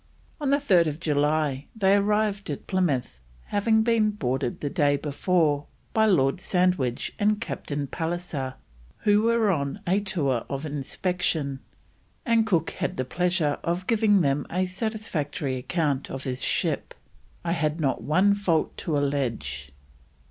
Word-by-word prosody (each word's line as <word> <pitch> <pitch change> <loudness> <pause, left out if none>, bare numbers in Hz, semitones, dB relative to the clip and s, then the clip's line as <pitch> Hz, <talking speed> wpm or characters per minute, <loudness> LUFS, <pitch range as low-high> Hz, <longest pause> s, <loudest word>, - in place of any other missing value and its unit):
On 290 -3 -1
3rd 185 - +3
July 150 -2 0
they 195 -2 +4
arrived 205 -1 +1
at 145 - -5
Plymouth, 140 - -1 0.3
having 220 +2 +3
been 225 -2 +3
boarded 130 -10 -2
the 145 - -3
day 145 -1 +2
before 150 0 +1 0.3
by 220 0 +4
Lord 145 -4 +2
Sandwich 180 -11 +1
and 210 0 +2
Captain 145 -9 -4
Pallisser, 160 -4 -3 0.5
who 205 0 +4
were 230 -2 +3
on 140 +1 -2
a 190 +3 +2
tour 155 - -1
of 135 +2 -3
inspection, 150 -1 -2 0.7
and 230 -3 +3
Cook 175 -7 +1
had - - -3
the 130 - -1
pleasure 175 0 0
of 175 +2 -1
giving 210 -3 +3
them 140 -1 0
a 185 +2 0
satisfactory 180 - -3
account 140 0 -1
of 135 0 -5
his 130 -1 -3
ship: - - 0 0.5
"I 170 - 0
had 160 -2 0
not 140 -4 0
one 185 +6 +3
fault 185 -6 0
to 155 -4 -1
allege." 135 - -2
170 Hz, 140 wpm, -26 LUFS, 140-200 Hz, 0.7 s, they